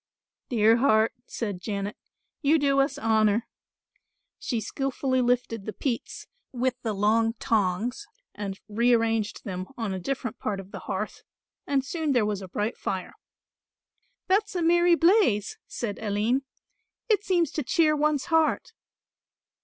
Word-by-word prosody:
"Dear 225 -2 +4
heart," 225 -3 +3
said 205 -6 -4
Janet, 200 +1 -3 0.5
"you 305 +1 +4
do 280 -2 +2
us 275 +1 +1
honour." 220 -3 +2 0.9
She 235 - -2
skilfully 260 +3 -1
lifted 240 -4 0
the 215 - -3
peats 245 -5 -3 0.3
with 255 0 0
the 220 -2 -2
long 225 +3 +2
tongs 225 - -1 0.3
and 195 -2 -5
rearranged 225 -1 +1
them 185 -2 -5
on 225 -5 -2
a 190 - -3
different 245 +3 -4
part 200 -2 -2
of 195 0 -10
the - - -6
hearth 195 +2 -3 0.5
and 275 -2 +1
soon 310 -1 -1
there 240 -4 +3
was 205 -2 -2
a 190 - -7
bright 210 +6 -2
fire. 185 -2 -4 1.1
"That's 395 +1 +1
a 350 - 0
merry 345 +1 +5
blaze," 345 - +3
said 215 -4 -4
Aline; 220 +5 0 0.6
"it 425 -3 +2
seems 345 -6 +1
to 305 - -2
cheer 305 +3 +3
one's 300 -2 +1
heart." 320 -1 +2
235 Hz, 140 wpm, -26 LUFS, 210-285 Hz, 1.1 s, merry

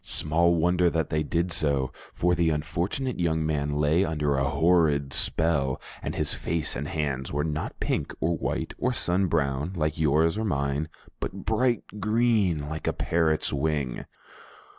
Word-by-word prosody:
Small 85 +3 +1
wonder 90 +1 +3
that 80 -2 -1
they 75 - +1
did 85 +3 -1
so, 70 -5 0 0.2
for 90 +1 +1
the 85 -2 +2
unfortunate 85 - -2
young 80 -2 +1
man 75 -2 -1
lay 75 +5 +3
under 75 -4 0
a 70 +1 +1
horrid 80 -5 +2
spell, 75 -5 +1 0.2
and - - -4
his - - -1
face 80 -1 -2
and 75 +2 -3
hands 75 -6 -2
were 75 +1 0
not 75 -1 -3
pink - - -1
or 85 +1 +1
white - - -3
or 125 - +1
sun 95 -3 +1
brown, 75 0 0
like 75 -1 -1
yours 80 +5 +3
or - - -1
mine, 70 -5 -1 0.3
but 95 0 -5
bright 120 +2 +1 0.2
green, 105 -7 +2
like 80 0 -5
a - - +2
parrot's 80 -2 +1
wing! 70 -3 -1
80 Hz, 160 wpm, -27 LUFS, 75-85 Hz, 0.3 s, wonder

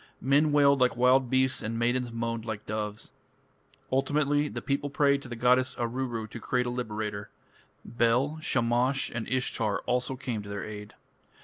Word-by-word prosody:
Men 145 +4 +3
wailed 140 -2 +4
like 125 -2 +3
wild 125 +1 +4
beasts 130 0 +2
and 115 +1 -3
maidens 120 +1 0
moaned 115 -1 -3
like 110 -2 -5
doves. 105 0 -4 0.8
Ultimately 145 +2 +1
the - - -5
people 140 0 -2
prayed 140 0 +2
to 140 - -9
the 120 - -5
goddess 125 +2 +3
Aruru 120 -1 -3
to 115 - -7
create 125 +2 0
a 120 - -2
liberator. 105 -4 -4 0.6
Bel, 120 +6 +1
Shamash, 125 0 +1
and 115 -1 -4
Ishtar 115 -4 -1
also 125 +1 -1
came 125 -4 -4
to 105 - -10
their 100 -1 -4
aid. 105 -1 -9
125 Hz, 165 wpm, -28 LUFS, 115-135 Hz, 0.8 s, wailed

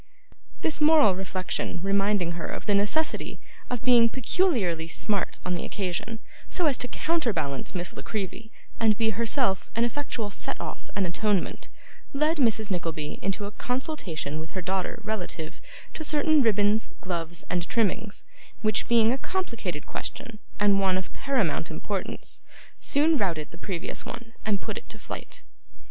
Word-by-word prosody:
This 315 -1 +1
moral 300 -9 +7
reflection 185 -1 -2
reminding 195 -2 +2
her 170 0 -4
of - - -5
the 205 - +3
necessity 210 +11 +1 0.3
of 245 -3 -2
being 240 -2 +7
peculiarly 230 - +1
smart 200 +4 -1
on 180 - 0
the 175 - -2
occasion, 195 +3 -2 0.3
so 355 - +1
as 290 -4 +4
to 250 - +1
counterbalance 210 - -1
Miss 175 -1 -2
La - - -5
Creevy, 215 +1 -4 0.3
and 220 -2 +4
be 225 -1 +3
herself 225 -2 +1
an 230 - +3
effectual 235 -4 -2
set - - +1
off - - -6
and 195 - +2
atonement, 200 +2 0 0.4
led 305 +4 +2
Mrs. 220 -5 +3
Nickleby 165 -4 -2
into 195 +1 -1
a 200 - -5
consultation 210 - -2
with 160 +4 -7
her - - 0
daughter 190 +5 -1
relative 185 -7 -4 0.3
to 315 - -4
certain 305 0 +4
ribbons, 215 -2 +3
gloves, 170 -3 -3
and 175 -1 -1
trimmings: 215 -2 0 0.4
which, 215 0 +2
being 230 0 +5
a 265 - -2
complicated 230 - -3
question, 220 -2 -4 0.2
and 200 -1 +5
one 190 -1 +3
of 185 - -5
paramount 225 - +1
importance, 190 +4 -4 0.4
soon 300 +1 +4
routed 165 -7 0
the - - -10
previous 185 -1 -4
one, 230 -1 -8
and 200 -3 +2
put - - -3
it - - -22
to - - -8
flight. - - -8
205 Hz, 155 wpm, -27 LUFS, 180-240 Hz, 0.4 s, moral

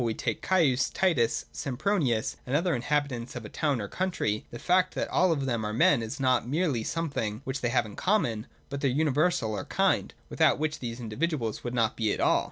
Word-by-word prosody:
we 115 -2 -1
take - - -2
Caius, 145 -9 +2
Titus, 145 -12 +1
Sempronius, 130 - 0
and 130 - 0
the - - +6
other 175 +2 +1
inhabitants 130 -2 -1
of 120 -3 -6
a - - -7
town 145 -5 0
or 100 - -4
country, 140 - -1
the 120 - -8
fact 185 +6 +2
that - - -1
all 185 -1 +3
of 140 -4 0
them 120 -4 -1
are 105 0 -2
men 120 +3 +4
is 110 +3 -5
not 130 -3 +2
merely 145 -6 0
something 140 -9 -2
which 135 0 -4
they 120 - +1
have 115 - +2
in 105 - -9
common, 140 - 0 0.2
but 140 0 -5
their 140 - +2
universal 145 -2 +1
or 105 - -4
kind, - - +1
without - - +3
which 155 0 -2
these 120 -1 -5
individuals 120 0 -2
would 120 0 -4
not 115 -2 +1
be 110 -2 0
at - - -2
all. - - +4
130 Hz, 215 wpm, -28 LUFS, 115-155 Hz, 0.2 s, the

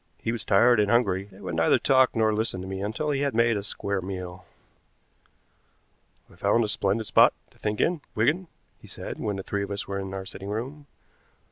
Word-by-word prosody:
He 115 - -2
was 115 -2 -4
tired 115 +4 +5
and 105 -1 +2
hungry, 100 -4 +2
and 95 +1 -14
would 90 -2 -4
neither 80 0 +4
talk 130 -2 +3
nor 110 -1 +3
listen 110 -3 -2
to 95 - -7
me 95 0 -4
until 110 +9 -2
he 140 -1 0
had 140 -4 0
made 115 0 +3
a 100 - -1
square 100 -1 -3
meal. 90 -1 -6 1.8
"I - - -19
found 115 - +2
a - - 0
splendid 105 +1 0
spot 105 - +5 0.2
to - - -25
think 105 0 -2
in, 170 -2 +1
Wigan," 150 +12 +1 0.3
he - - -15
said, - - -7
when 105 - -2
the 95 - -5
three 100 +1 -2
of 100 - -4
us 100 0 -4
were 100 0 -3
in 95 0 -5
our 95 0 -5
sitting 95 +1 -8
room. 135 +8 -5
105 Hz, 215 wpm, -26 LUFS, 95-120 Hz, 1.8 s, tired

